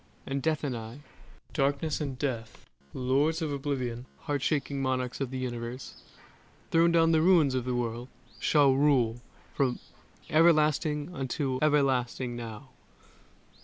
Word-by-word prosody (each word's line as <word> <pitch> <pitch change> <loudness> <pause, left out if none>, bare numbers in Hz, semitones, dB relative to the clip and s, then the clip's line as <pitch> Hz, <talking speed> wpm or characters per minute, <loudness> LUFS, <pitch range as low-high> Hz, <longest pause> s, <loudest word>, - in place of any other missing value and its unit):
and 135 0 -2
Death 155 +1 0
and 135 -4 -2
I, 115 +4 -8 0.5
Darkness 145 +2 0
and 135 -4 -3
Death, 120 -6 -4 0.3
Lords 140 +6 +1
of 160 -3 -2
Oblivion, 130 -4 -3
Heart 145 -4 -2
shaking 140 -1 -1
monarchs 130 -1 -2
of 135 - -1
the 130 - -5
universe, 120 0 -6 0.7
Throned 170 +1 +4
on 165 0 +5
the 160 -1 +4
ruins 165 -6 +4
of 130 -2 -1
the 125 -1 -1
world, 120 0 -3 0.3
shall 145 -3 +4
rule 130 -5 +2 0.3
From 130 -3 +1 0.5
everlasting 155 0 +3
unto 135 -2 -2
everlasting 130 -4 +1
now! 115 +2 -8
135 Hz, 130 wpm, -29 LUFS, 125-150 Hz, 0.7 s, on